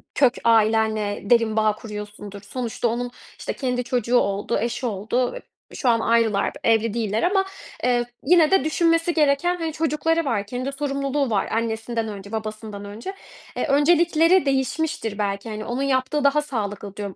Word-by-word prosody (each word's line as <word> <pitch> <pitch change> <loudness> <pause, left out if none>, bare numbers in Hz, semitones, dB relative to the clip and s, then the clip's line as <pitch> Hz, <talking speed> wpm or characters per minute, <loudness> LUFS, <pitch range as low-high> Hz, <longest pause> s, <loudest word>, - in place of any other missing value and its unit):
kök 260 -3 +4
ailenle 220 -2 +2
derin 230 -2 +4
bağ 215 -1 +3
kuruyorsundur." 210 -2 -8
Sonuçta 235 +3 -3
onun, 245 +2 -2 0.3
işte, - - -3
kendi 250 -2 -2
çocuğu 245 0 +1
oldu, 200 -2 0
eşi 235 +2 -2
oldu. 230 +3 -1
Eee, - - -7 0.3
şu 255 - +1
an 230 -1 +4
ayrılar, 225 -3 +2
evli 225 -1 +2
değiller 220 -2 -1
ama, 385 +1 +2 0.4
eee, 245 -1 +2 0.2
yine 330 +2 +5
de 385 - +4
düşünmesi 330 +2 +2
gereken, 310 +3 +2
hani, 325 -3 -3
çocukları 325 +1 0
var. 215 -7 0
Kendi 255 +5 -4
sorumluluğu 275 -1 -1
var 200 -3 0
annesinden 225 0 -2
önce, 200 -1 -8
babasından 215 -2 -5
önce. 220 - -7 0.4
Eee, - - -1
öncelikleri 330 +3 +4
değişmiştir. 265 -4 -1
"Belki, 200 +1 -2
hani, 215 0 -5
onun 245 +3 -3
yaptığı 270 +2 0
daha 280 +2 +4
sağlıklı." 205 -7 -5
diyorum 200 -2 -5
240 Hz, 155 wpm, -23 LUFS, 215-285 Hz, 0.4 s, yine